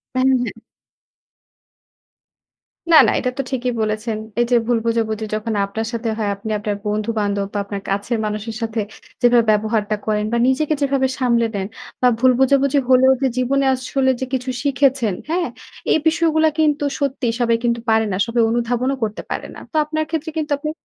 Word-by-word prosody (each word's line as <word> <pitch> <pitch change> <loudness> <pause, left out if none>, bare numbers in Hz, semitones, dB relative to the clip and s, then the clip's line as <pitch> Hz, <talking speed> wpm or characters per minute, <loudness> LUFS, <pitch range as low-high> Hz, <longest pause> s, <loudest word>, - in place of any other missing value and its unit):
হ্যাঁ, 255 - +2 0.2
হ্যাঁ। 225 -2 -5 2.3
না, - - +9
না - - +3
এটা 250 - -1
তো - - +1
ঠিকই 250 -1 -1
বলেছেন। 215 +1 -1 0.2
এই - - +4
যে - - +4
ভুল 240 -1 +2
বোঝাবুঝি, 220 -1 0
যখন 215 +1 -2
আপনার 220 +3 -4
সাথে 230 0 -3
হয়, 215 -2 -1
আপনি 210 +2 -7
আপনার 205 -1 -2
বন্ধু 210 +2 -1
বান্ধব 200 -1 0
বা - - 0
আপনার 200 0 -6
কাছের 200 +4 -1
মানুষের 215 +1 -4
সাথে 225 0 -1 0.4
যেভাবে 240 -2 +5
ব্যবহারটা 215 0 +1
করেন 210 -1 0
বা - - +2
নিজেকে 305 +4 +1
যেভাবে 275 -1 +2
সামলে 235 -3 +2
নেন 195 -1 -2 0.4
বা 250 - +6
ভুল 255 +1 +5
বোঝাবুঝি 275 +1 +3
হলেও 260 +1 +6
যে 265 - +3
জীবনে 275 +2 +1
আসলে 260 +1 0
যে - - 0
কিছু 260 0 -2
শিখেছেন 270 -6 +2
হ্যা? 330 - 0 0.6
এই - - +4
বিষয়গুলো 320 -1 +2
কিন্তু 295 -2 +2 0.2
সত্যি 275 -2 -1
সবাই 230 -1 +3
কিন্তু 235 -1 +1
পারে 220 0 +3
না। - - -1
সবাই 235 0 +1
অনুধাবনও 240 +3 0
করতে 215 -1 -2
পারে - - -3
না। - - -12
তো - - -3
আপনার 310 +1 -2
ক্ষেত্রে 320 0 -2
কিন্তু 300 -1 -3
আপনি 305 +1 -3
240 Hz, 180 wpm, -20 LUFS, 220-270 Hz, 2.3 s, না